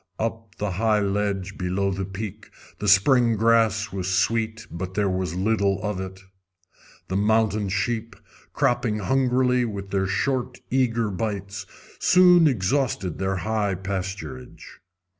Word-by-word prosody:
Up 115 0 -3
on - - -34
the 105 -1 -2
high 110 -1 +2
ledge 100 -1 -2
below 95 +2 0
the 95 +1 -3
peak 105 +2 -7 0.3
the 105 - -3
spring 115 +4 +5
grass 110 -1 +2
was 95 -2 -3
sweet, 110 +4 0
but 95 +2 -6
there 105 -1 +1
was 95 -2 -2
little 100 0 +1
of 105 -3 -2
it. 95 0 -8 0.9
The 95 - -3
mountain 105 0 +2
sheep, 110 +4 -2 0.4
cropping 115 -3 +1
hungrily 125 +2 +2
with 100 -4 -5
their 95 -1 +1
short, 125 +5 -1
eager 115 -4 +1
bites, 100 -1 -4 0.3
soon 180 -2 +6
exhausted 105 - 0
their 95 0 0
high 105 -3 0
pasturage. 95 -8 -6
105 Hz, 135 wpm, -24 LUFS, 95-115 Hz, 0.9 s, soon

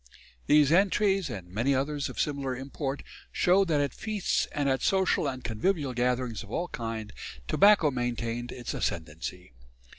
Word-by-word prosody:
These 150 -1 +5
entries, 195 +1 +3
and 95 -4 -6
many 120 +9 +1
others 140 +2 -1
of - - -8
similar 140 -3 -1
import, 135 +1 -4 0.3
show 185 +2 +4
that 160 -5 +1
at 140 -3 0
feasts 215 -3 -1
and 145 -2 -1
at 135 -1 +1
social 190 -5 +2
and 130 -2 -4
convivial 135 - -1
gatherings 125 -2 0
of 105 - -11
all 175 +10 -2
kinds, 115 -3 -5 0.4
tobacco 195 - +5
maintained 120 -1 -3
its 125 -2 -5
ascendancy. 80 -1 -4
135 Hz, 150 wpm, -28 LUFS, 115-155 Hz, 0.4 s, These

